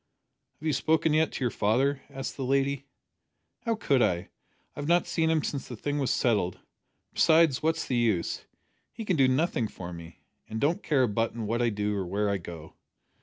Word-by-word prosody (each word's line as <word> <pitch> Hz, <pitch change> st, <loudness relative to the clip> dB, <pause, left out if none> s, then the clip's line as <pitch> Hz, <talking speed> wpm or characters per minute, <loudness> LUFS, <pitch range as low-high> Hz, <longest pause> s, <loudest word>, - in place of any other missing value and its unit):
"Have 155 Hz, -, -10 dB
you 155 Hz, -, +2 dB
spoken 160 Hz, +2 st, +2 dB
yet 155 Hz, +1 st, +3 dB
to -, -, -3 dB
your 120 Hz, -, +1 dB
father?" 135 Hz, +6 st, +1 dB
asked 135 Hz, -1 st, -5 dB
the 135 Hz, -, -4 dB
lady. 140 Hz, +1 st, +1 dB, 0.8 s
"How 230 Hz, -1 st, +1 dB
could 140 Hz, -, +2 dB
I? 90 Hz, -6 st, +1 dB, 0.5 s
I've 145 Hz, -, -4 dB
not 175 Hz, +1 st, +4 dB
seen 160 Hz, -1 st, 0 dB
him 160 Hz, -2 st, +2 dB
since 140 Hz, -, -3 dB
the 120 Hz, -, -6 dB
thing 145 Hz, +6 st, -2 dB
was 135 Hz, -, 0 dB
settled. 105 Hz, -7 st, +1 dB, 0.6 s
Besides, 160 Hz, -4 st, +4 dB
what's 160 Hz, +1 st, 0 dB
the 125 Hz, -, -1 dB
use? 110 Hz, -8 st, 0 dB, 0.5 s
He 225 Hz, -1 st, -7 dB
can 185 Hz, -, +1 dB
do 135 Hz, -4 st, +5 dB
nothing 130 Hz, -3 st, +1 dB
for 90 Hz, -3 st, -8 dB
me, 85 Hz, -2 st, -11 dB, 0.3 s
an' 110 Hz, -, -4 dB
don't 160 Hz, -, +1 dB
care 140 Hz, -4 st, +2 dB
a -, -, +3 dB
button 115 Hz, +1 st, -1 dB
what 115 Hz, +3 st, 0 dB
I 120 Hz, -, +3 dB
do 105 Hz, -1 st, -1 dB
or 95 Hz, -3 st, -2 dB
where 100 Hz, +3 st, 0 dB
I 100 Hz, -, +1 dB
go." 85 Hz, -2 st, -9 dB
130 Hz, 200 wpm, -28 LUFS, 105-155 Hz, 0.8 s, do